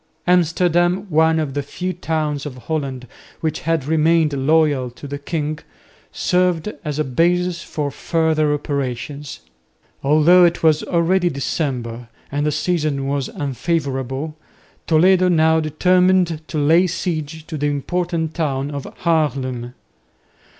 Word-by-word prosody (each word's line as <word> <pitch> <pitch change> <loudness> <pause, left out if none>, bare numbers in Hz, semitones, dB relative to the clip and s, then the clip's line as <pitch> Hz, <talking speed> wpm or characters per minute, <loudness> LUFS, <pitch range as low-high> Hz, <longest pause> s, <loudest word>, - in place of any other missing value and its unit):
Amsterdam, 175 +1 +2
one 160 +1 +4
of 150 -4 -2
the 145 - -1
few 180 +6 -4
towns 155 -4 -2
of 130 -3 -8
Holland 135 -2 -4 0.3
which 160 -1 -2
had 165 -4 -1
remained 160 0 +2
loyal 140 -2 +2
to 125 +4 -11
the 140 0 -5
king, 150 0 -3 0.5
served 180 +1 0
as 150 -3 -3
a 155 - +1
basis 175 +5 +1
for 145 -4 -4
further 160 -2 +1
operations. 140 -1 -4 0.6
Although 155 +5 +5
it 170 -1 +2
was 155 -1 +4
already 175 +1 +1
December 125 -4 -3 0.2
and 145 +1 0
the - - +1
season 150 -4 -1
was 140 -1 -1
unfavourable, 140 - -3 0.5
Toledo 180 +3 +4
now 160 -1 +4
determined 180 +1 +2
to - - -4
lay 165 +5 +4
siege 160 -3 -4
to 160 - -6
the 145 0 -1
important 160 +2 -2
town 145 -4 -2
of 140 -2 -5 0.2
Haarlem. 130 -7 0
155 Hz, 130 wpm, -20 LUFS, 140-170 Hz, 0.6 s, Although